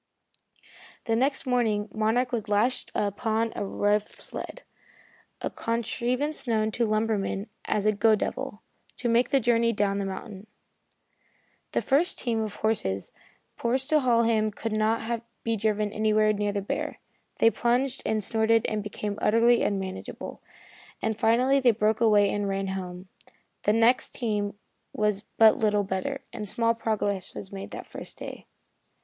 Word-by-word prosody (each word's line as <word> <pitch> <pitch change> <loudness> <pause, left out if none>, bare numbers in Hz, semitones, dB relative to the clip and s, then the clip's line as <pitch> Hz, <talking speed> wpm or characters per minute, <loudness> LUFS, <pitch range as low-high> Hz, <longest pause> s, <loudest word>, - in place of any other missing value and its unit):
The 225 - +1
next 270 +4 +1
morning 225 -5 +1
Monarch 225 +3 +1
was 225 -3 -3
lashed 215 +5 +1
upon 220 +2 0
a - - -2
rough 205 +1 +1
sled - - -4 0.8
a - - -2
contrivance 245 +5 -1
known 220 -2 +1
to 235 +1 0
lumbermen 215 -2 0 0.2
as 210 -1 0
a 215 - +5
"go 215 +1 +4
devil" 240 0 -4 0.3
to 245 - -2
make 235 +1 +3
the 275 - +4
journey 235 -1 +3
down 200 -1 0
the 200 - -1
mountain. 195 +1 -7 1.3
The - - +1
first 305 +7 +2
team 230 -3 -1
of 215 -2 -4
horses 100 - -1 0.5
procured 260 +4 0
to 310 - +5
haul 240 -4 +3
him 220 -2 +2
could 220 +2 -5
not 225 +2 0 0.2
be 230 0 0
driven 215 -1 0
anywhere 215 0 +3
near 205 0 -1
the 200 -1 -2
bear. - - -3 0.4
They 225 - +5
plunged 245 +3 0
and 215 -1 0
snorted 225 +1 +2
and 215 -1 -1
became 210 0 -4
utterly 230 +2 +4
unmanageable, 190 -2 -4 0.6
and 220 0 -1
finally 245 +5 +3
they 255 -2 +4
broke 220 0 +1
away 210 -3 +5
and 205 -1 -1
ran 195 0 -2
home. 185 -1 -5 0.6
The 210 - +4
next 230 +3 +3
team 205 -3 -2 0.4
was 210 -1 0 0.2
but 220 -1 +6
little 210 -2 +2
better, 200 +9 -3
and 210 -2 -4
small 230 +1 +2
progress 205 -4 -2
was 190 - -7
made 195 0 -7
the - - -7
first - - -7
day. - - -8
220 Hz, 155 wpm, -27 LUFS, 205-235 Hz, 1.3 s, but